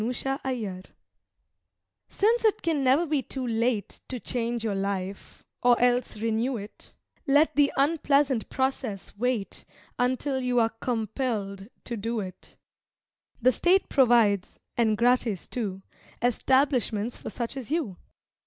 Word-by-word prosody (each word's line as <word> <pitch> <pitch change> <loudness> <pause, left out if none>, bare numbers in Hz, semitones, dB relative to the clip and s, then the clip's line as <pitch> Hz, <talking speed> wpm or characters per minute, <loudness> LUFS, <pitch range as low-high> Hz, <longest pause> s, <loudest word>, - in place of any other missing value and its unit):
_" 245 -5 -3 1.3
Since 455 +4 +2
it 435 -1 +2
can 315 -4 +1
never 270 +6 +4
be 300 -3 0
too 260 +1 -5
late 230 -2 -1
To 255 - -4
change 235 -1 -2
your 220 -3 0
life, 195 0 -4 0.2
or 245 -1 +4
else 245 -2 +2
renew 225 +4 0
it, 205 0 -11 0.4
Let 290 +3 +4
the 285 -1 +4
unpleasant 280 -4 +2
process 260 -6 -2
wait 230 -2 -2 0.4
Until 260 +2 0
you 250 -1 +1
are 225 -1 +3
compelled 220 -3 -3 0.2
to 235 - -4
do 225 +2 -2
it. 185 -3 -9 0.9
The 255 - +6
State 360 - +2
provides 230 -7 +3 0.2
(and 220 -3 +2
gratis 235 -4 +2
too) 195 -6 -4 0.4
Establishments 245 -2 +1
for - - -7
such 235 +2 -4
as 260 -5 -6
you. 285 - -1
245 Hz, 125 wpm, -27 LUFS, 215-270 Hz, 1.3 s, The